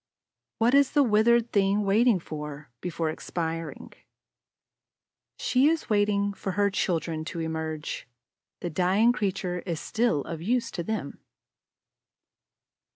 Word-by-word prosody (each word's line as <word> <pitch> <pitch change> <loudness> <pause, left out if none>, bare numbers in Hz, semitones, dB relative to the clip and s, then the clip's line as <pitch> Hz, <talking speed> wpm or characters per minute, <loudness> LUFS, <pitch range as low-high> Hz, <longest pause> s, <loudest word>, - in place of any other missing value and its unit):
What 235 +3 +3
is 280 -1 +4
the 290 -1 +5
withered 235 +1 +3
thing 200 +1 +2
waiting 215 +3 +4
for, 150 -4 -7
before 165 -3 -2
expiring? 165 0 -5 1.4
She 260 +3 +3
is 320 -6 0
waiting 205 -1 +2
for 195 -1 -4
her 200 0 +2
children 165 -4 -1
to 170 - -5
emerge; 160 -1 -4 0.5
the 175 - -3
dying 190 +8 +3
creature 190 -5 -2
is 170 -3 -4
still 220 -9 0
of 165 -1 -6
use 240 +7 0
to 175 - -4
them. 185 -5 -4
195 Hz, 120 wpm, -27 LUFS, 165-220 Hz, 1.4 s, the